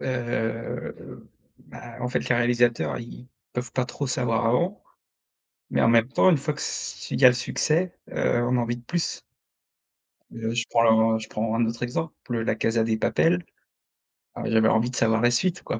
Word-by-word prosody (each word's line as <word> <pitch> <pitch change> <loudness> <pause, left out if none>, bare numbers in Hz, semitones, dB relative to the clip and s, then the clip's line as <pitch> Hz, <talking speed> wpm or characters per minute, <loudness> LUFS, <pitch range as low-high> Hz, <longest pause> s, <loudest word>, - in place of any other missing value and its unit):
...heu, 120 -3 -4 0.4
bah 120 -1 -12
en 125 - -2
fait 125 - -2
les 125 - +3
réalisateurs 120 0 +1
ils 120 +1 -10 0.3
peuvent 125 -1 -4
pas 130 - 0
trop 140 +2 -5
savoir 120 -2 0
avant, 170 - 0 0.9
mais - - +1
en - - +4
même 115 0 +4
temps 160 +7 +4
une 165 - +3
fois 150 +2 -2
que 150 - -9
s - - -5
il - - -2
y 130 - +9
a - - +11
le 125 - +2
succès, 165 +7 0 0.2
heu, 120 - +1
on 125 +1 +1
a - - +2
envie 120 0 -2
de - - -16
plus. 175 +5 -2 1.1
Heu, 115 -1 -4
je 120 0 0
prends 110 -1 +4
je 110 0 -8
prends 110 +1 -2
un 115 +1 +2
autre 115 +1 -5
exemple, 125 +6 -2 0.2
heu, 115 -1 -1
La 110 - 0
Casa 115 +1 +1
de 110 -1 0
Papel, 175 +9 +1 0.9
ah - - -5
j'avais 110 0 +3
envie 115 +2 +2
de 125 - -7
savoir 110 0 +2
la 120 0 +4
suite, 180 +8 0
quoi. - - -3
120 Hz, 200 wpm, -25 LUFS, 115-130 Hz, 1.1 s, a